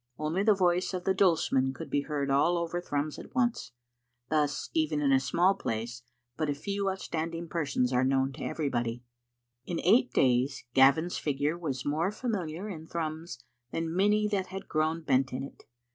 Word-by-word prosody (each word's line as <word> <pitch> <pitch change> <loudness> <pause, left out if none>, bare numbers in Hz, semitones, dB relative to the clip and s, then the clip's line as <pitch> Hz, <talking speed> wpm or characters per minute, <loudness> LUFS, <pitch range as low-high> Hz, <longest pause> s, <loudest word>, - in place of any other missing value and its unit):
Only 155 +5 -1
the 210 0 +4
voice 180 0 +1
of 180 - -4
the 190 - +2
dulsemen 155 -8 +2
could - - -8
be 145 - +2
heard 140 -2 -2
all 170 +6 +3
ovei 170 +1 -2
Thrums 145 -1 -2
at - - -12
once. 240 -2 0 0.6
Thus 150 -2 0
even 155 -2 +1
in 140 -2 +2
a 135 - +5
small 175 +8 +3
place 115 - -4 0.4
but 155 -1 -1
a 145 - 0
few 200 +6 -2
outstanding 170 -3 -4
persons 140 -6 0
are 125 +1 +3
known 135 0 +1
to - - -8
everybody. 120 -5 -2 0.6
In 170 - -2
eight 230 +8 +4
days 130 +2 +2
Gavin's 140 +6 +4
figure 145 +2 0
was 140 -7 -4
more 160 +6 0
familiar 200 -6 -3
in 160 -6 -7
Thrums 160 -5 -5 0.3
than 165 +3 -3
many 210 +2 +3
that 195 -3 -1
had 190 +1 -7
grown 160 +1 0
bent 135 -3 +2
in 130 +1 -3
it. 140 - -11
155 Hz, 175 wpm, -29 LUFS, 135-180 Hz, 0.6 s, a